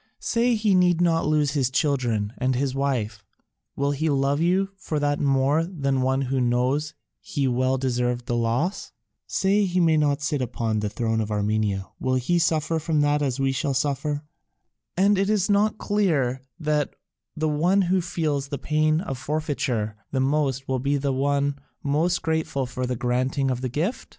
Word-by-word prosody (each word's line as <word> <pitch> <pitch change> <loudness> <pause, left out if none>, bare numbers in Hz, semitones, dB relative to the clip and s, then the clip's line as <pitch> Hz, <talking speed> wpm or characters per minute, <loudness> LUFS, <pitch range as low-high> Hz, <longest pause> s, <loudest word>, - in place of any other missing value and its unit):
Say 235 +1 +1
he 210 -2 +2
need 180 -2 +4
not 165 -3 +2
lose 150 -2 +2
his 135 -4 +1
children 125 -7 0
and 130 0 +1
his 135 +1 0
wife, 120 -7 -2 0.5
will 140 +1 0
he 155 +3 -1
love 140 0 +1
you 185 +3 +2
for 165 -5 -3
that 145 0 0
more 140 +3 +2
than 140 -7 -1
one 130 +1 +1
who 130 0 -1
knows 130 +5 0 0.2
he 140 -2 -2
well 130 +1 +1
deserved 125 -2 -1
the 120 - -1
loss? 120 - -1 0.3
Say 200 +2 +2
he 180 -1 0
may 165 -2 +4
not 145 -1 +1
sit 150 -2 -1
upon 115 -3 -1
the 105 0 -2
throne 110 +1 -1
of 105 - -3
Armenia, 105 -2 0
will 130 0 0
he 150 +8 +1
suffer 160 0 +1
from 155 -1 0
that 145 0 +2
as 135 -2 -1
we 135 0 +2
shall 140 0 -1
suffer? 145 +2 -1 0.7
And 200 +1 +4
is 200 0 +1
it - - +4
not 210 +1 +2
clear 155 - 0 0.2
that 150 -2 0 0.4
the 155 0 0
one 175 +7 +2
who 185 +1 +2
feels 155 -5 -2
the 140 0 -4
pain 155 +2 +1
of 135 -9 -5
forfeiture 130 -8 -2
the 135 - 0
most 135 -1 0
will 130 -1 0
be 140 +3 0
the 140 -1 -1
one 140 +1 0 0.2
most 160 +5 +1
grateful 160 -4 -1
for 125 0 -4
the 125 - -1
granting 130 +3 0
of 125 -1 -3
the 130 - -2
gift? 165 - -2
140 Hz, 180 wpm, -24 LUFS, 130-160 Hz, 0.7 s, need